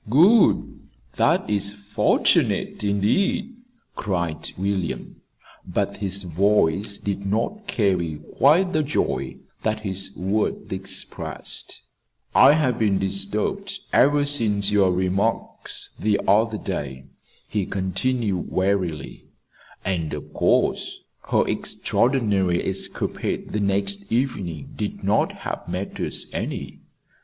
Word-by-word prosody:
"Good! 185 - +4 0.4
That - - +3
is 100 -1 0
fortunate, 105 +1 +1
indeed," 105 - +1 0.4
cried 85 -6 -2
William; 95 -2 -3 0.4
but - - -2
his 100 -1 -2
voice 100 +2 +2
did 100 -1 -3
not 115 - -2
carry 90 -8 0 0.2
quite 175 +7 +5
the 155 - +3
joy 150 0 -1 0.3
that 110 0 -1
his 95 -1 -3
words 100 +4 -1
expressed. - - -4 0.5
"I 140 - +8
have 145 -6 +1
been 105 -3 +2
disturbed 105 - -1 0.2
ever 145 +1 +4
since 105 -8 +3
your 100 -3 +4
remarks 95 +5 -2
the 105 -1 +2
other 110 +3 +3
day," 70 -10 -5 0.4
he 105 -3 -2
continued 95 +1 -1
wearily; 95 -6 -1 0.6
"and 85 -5 -1
of - - -9
course - - +1 0.3
her - - +3
extraordinary 105 -9 +1
escapade 95 0 -2
the 105 - -1
next 100 0 0
evening 100 - -2
did - - -4
not - - +2
help - - -6
matters - - -2
any. - - -4
100 Hz, 105 wpm, -23 LUFS, 95-115 Hz, 0.6 s, I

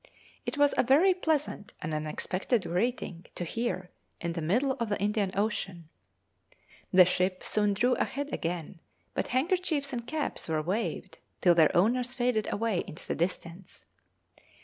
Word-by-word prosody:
It - - -2
was 290 0 +4
a - - +4
very 300 +10 +5
pleasant 310 - -1
and 155 0 -4
unexpected 185 +8 -1
greeting 180 -2 -2
to - - -3
hear 185 -1 -3 0.3
in 170 -1 -2
the 165 - -3
middle 240 - +2
of 230 -2 -1
the 205 - -1
Indian 205 -1 +1
Ocean. 195 -5 -2 1.0
The 185 -1 +8
ship 185 +1 0
soon 210 -1 +1
drew 245 +5 +3
ahead 285 +3 -2
again, 165 0 -3 0.3
but - - -1
handkerchiefs 300 0 0
and 235 -1 -4
caps 305 0 -3
were 155 -1 0
waved 195 +8 -3 0.2
till 175 - +6
their 165 +1 +4
owners 245 +6 +2
faded 240 -4 +1
away 220 -4 0
into 155 - -7
the - - 0
distance. 170 +1 -4
205 Hz, 150 wpm, -29 LUFS, 175-250 Hz, 1.0 s, The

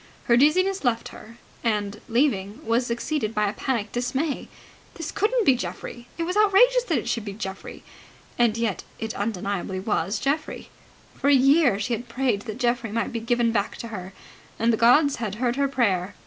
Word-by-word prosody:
Her 235 - +4
dizziness 370 +9 +3
left 235 -3 0
her; 230 +2 -13 0.3
and, 210 -2 -1
leaving, 230 -1 0
was 235 +2 +1
succeeded 235 -1 -2
by 210 0 +2
a 200 - -2
panic 230 -6 -2
dismay. 260 +5 -2 0.5
This 330 -2 -5
couldn't 450 +2 +1
be 270 - +6
Geoffrey! 240 0 -6
It 335 - -1
was 360 +3 -2
outrageous 430 +5 +5
that 330 - +1
it - - -3
should 235 -2 -1
be 200 -2 -6
Geoffrey! 190 -2 -7 0.5
And 235 -2 +2
yet 230 -4 -1
it 220 0 -4
undeniably 195 -2 -3
was 205 +1 -1
Geoffrey. 285 +7 -3 0.4
For 280 - 0
a 285 - +7
year 275 -4 +4
she 225 +4 -1
had 240 +2 -4
prayed 245 -5 0
that 215 0 -5
Geoffrey 240 -3 0
might 230 +1 -2
be 230 - -1
given 235 0 +1
back 205 -3 -1
to 230 - -7
her, 190 -4 -7 0.5
and 230 +1 +2
the - - +4
gods 270 +6 +4
had 215 -4 -3
heard 240 +1 0
her 280 0 +1
prayer. 205 -8 0
235 Hz, 190 wpm, -24 LUFS, 210-275 Hz, 0.5 s, a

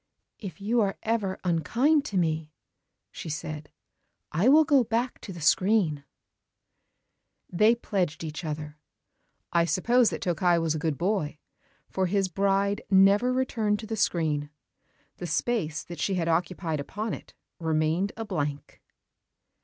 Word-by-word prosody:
"If 200 -2 -8
you 225 +4 +1
are 195 -2 0
ever 215 -4 -1
unkind 245 - +2
to 205 - -3
me," 160 -3 0 0.6
she - - -7
said, 150 0 -5 0.6
"I 180 +11 +3
will 310 +3 +7
go 285 -4 +4
back 235 +3 -2
to 200 - -8
the 175 - -8
screen." 160 -2 +2 1.5
They 215 +6 +4
pledged 180 -9 -2
each 155 +1 -5
other. 150 -1 -5 0.7
I 170 -1 +4
suppose 235 +7 +3
that - - -5
Tokkei 175 0 +2
was 165 -2 0
a 155 - -3
good 155 -3 -1
boy, 175 -5 -1 0.5
for 190 -1 -1
his 195 0 +1
bride 195 +2 +1
never 200 +5 +5
returned 230 -5 0
to - - -7
the 220 +1 -3
screen. 155 -7 0 0.7
The 175 - -5
space 165 -2 -1
that 175 - -9
she 195 - 0
had 170 -2 -1
occupied 165 -1 -1
upon 205 +9 -4
it - - -10 0.2
remained 160 +4 0
a 225 - -4
blank. 150 -7 -4
185 Hz, 145 wpm, -27 LUFS, 160-215 Hz, 1.5 s, will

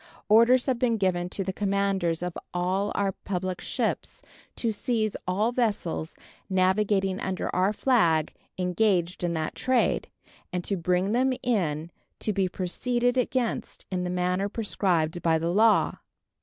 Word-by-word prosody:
Orders 235 +4 +6
have 255 -3 0
been 235 -2 +2
given 180 -3 0
to 195 - -3
the 190 0 -3
commanders 195 -4 0
of 180 -1 -3 0.2
all 185 +3 0
our 200 -1 +1
public 185 -1 -4
ships - - -3 0.3
to 230 - 0
seize 215 -1 -1
all 205 +6 +1
vessels 205 -10 -1 0.3
navigated 190 0 +2
under 190 -1 -3
our 185 +2 +3
flag 175 - +2 0.2
engaged 180 -1 +1
in 175 -1 0
that 155 -1 -2
trade, 260 -1 +1 0.4
and 180 -1 -2
to 200 - -1
bring 180 +2 0
them 255 +3 +2
in 170 - 0 0.3
to 215 - -1
be 190 -1 +1
proceeded 240 +7 0
against 250 -1 -1
in 180 -1 -1
the 180 - -2
manner 180 +2 0
prescribed 180 -6 0
by 165 -1 +3
the 165 +2 -1
law. 220 +2 +3
190 Hz, 145 wpm, -27 LUFS, 180-220 Hz, 0.4 s, Orders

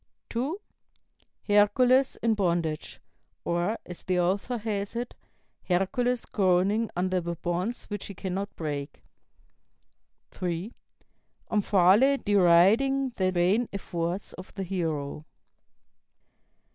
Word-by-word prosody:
(2) 275 - -2 0.9
Hercules 250 +6 +4
in 230 -1 +3
bondage; 170 -6 -1 0.5
or, 175 +6 0
as 180 - -9
the 185 -1 0
author 195 +7 0
has 210 -1 -3
it, 240 +1 -4 0.5
'Hercules 225 +7 0
groaning 195 +3 +2
under 185 +1 0
the 170 0 -4
bonds 175 +7 -3
which 205 -2 -6
he 200 - -9
cannot 195 +2 -4
break.' 145 -3 -5 1.3
(3) 180 +4 -4 0.8
Omphale 210 +6 +4
deriding 205 +9 +4
the 185 -5 0
vain 185 +7 +2
efforts 175 -1 -4
of 185 - -11
the 195 - -3
hero." 160 -6 -3
195 Hz, 100 wpm, -27 LUFS, 175-225 Hz, 1.3 s, Hercules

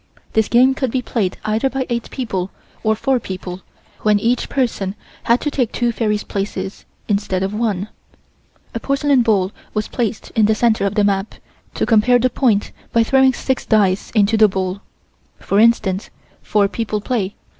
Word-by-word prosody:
This 220 -1 +2
game 255 +3 +5
could 265 -1 -1
be 250 +2 -1
played 205 -6 -1
either 220 +5 +1
by 265 0 -2
eight 235 -1 -3
people 195 -8 -3 0.3
or 220 0 +2
four 260 +3 +1
people, 185 -3 -7 0.4
when 210 -1 +3
each 235 +4 0
person 215 -7 -1 0.3
had 235 +1 +4
to 295 - -1
take 250 -6 0
two 240 -1 0
fairies' 210 -2 -1
places, 195 -1 -4 0.2
instead 200 -3 0
of 195 +2 -2
one. 210 -3 -1 0.9
A - - -3
porcelain 275 -1 +2
bowl 205 -5 +2 0.2
was 215 0 -1
placed 225 -4 -3
in 220 -3 +3
the 220 - +3
center 220 -3 +2
of 200 - -4
the 210 - +3
map, 200 0 0 0.4
to - - 0
compare 240 +2 +4
the 250 +1 +1
point 225 -6 +1 0.2
by 230 - +4
throwing 265 +2 +4
six 260 +1 -2
dice 200 -3 +2
into 215 +1 +3
the 215 0 +7
bowl. 190 0 -3 0.6
For 200 - 0
instance, 215 -4 +2 0.3
four 205 -2 +2
people 215 0 -3
play. 205 -3 -2
215 Hz, 175 wpm, -19 LUFS, 200-245 Hz, 0.9 s, the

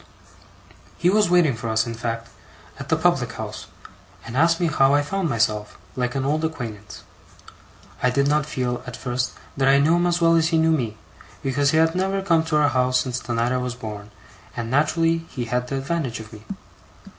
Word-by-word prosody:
He 175 +1 +3
was 210 -2 +3
waiting 175 -7 +4
for 115 +1 -5
us, 110 0 +2
in 115 - -4
fact, 115 0 -4 0.5
at - - -8
the - - +4
public - - +1
house; - - -7 0.6
and 115 +2 -7
asked 165 +4 +3
me 175 - +1
how 140 -3 +3
I 145 - +3
found 190 +2 -2
myself, 110 -3 0 0.2
like 125 0 -2
an 135 -1 -1
old 155 +3 0
acquaintance. 115 -10 -5 1.0
I 125 - +3
did 140 +2 +1
not 150 0 +1
feel, 125 -3 -2
at 125 - -7
first, 125 0 -2 0.2
that 135 -1 +1
I 135 0 +6
knew 155 +5 +4
him 175 0 +2
as 175 0 +1
well 165 -1 +4
as 165 -1 +3
he 165 -1 +1
knew 160 0 +3
me, 120 -9 -1 0.5
because 140 +1 +1
he 155 - +2
had 160 0 +3
never 190 +1 -1
come 165 -4 +3
to 160 -2 +1
our 150 -1 +4
house 125 -1 +2
since 125 -1 -2
the 120 -2 -4
night 115 +2 +1
I 130 - +1
was 125 -1 -3
born, 105 -4 -8 0.5
and 115 -1 -4
naturally 165 +4 +2
he 125 -3 -4
had 125 +2 -1
the 135 - -3
advantage 135 -3 -2
of 110 0 -11
me. 105 0 -12
135 Hz, 210 wpm, -23 LUFS, 120-160 Hz, 1.0 s, I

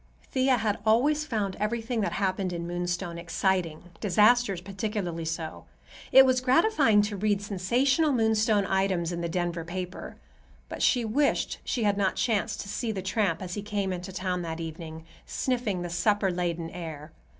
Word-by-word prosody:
Thea 260 -1 +3
had 215 -3 -1
always 280 +8 +3
found 210 -8 -2
everything 225 +2 -1
that 205 - -1
happened 190 -1 -1
in 170 -1 -4
Moonstone 175 0 -3
exciting, 170 -1 -1 0.2
disasters 210 0 +3
particularly 190 -3 -4
so. 160 -1 -5 0.5
It 265 0 +9
was 255 -1 +2
gratifying 260 - +4
to 205 0 -3
read 205 0 +1
sensational 245 - +1
Moonstone 220 -4 +2
items 190 -3 0
in 170 0 -3
the 170 - -2
Denver 175 -1 -2
paper. 180 +2 -6 0.5
But - - -6
she 245 -3 +3
wished 280 +7 +1
she 240 - -1
had 205 -1 +2
not 190 -2 +1
chanced 220 -5 0
to - - -9
see 220 +3 -2
the 190 -3 -4
tramp 190 -3 0
as 180 -1 -5
he 205 - -3
came 200 -2 -2
into 180 +1 -6
town 185 -1 -2
that 165 -1 -5
evening, 160 0 -7 0.2
sniffing 235 -8 -1
the 175 - -4
supper 205 +2 +2
laden 170 -2 -2
air. 155 -3 -7
195 Hz, 165 wpm, -27 LUFS, 175-220 Hz, 0.5 s, It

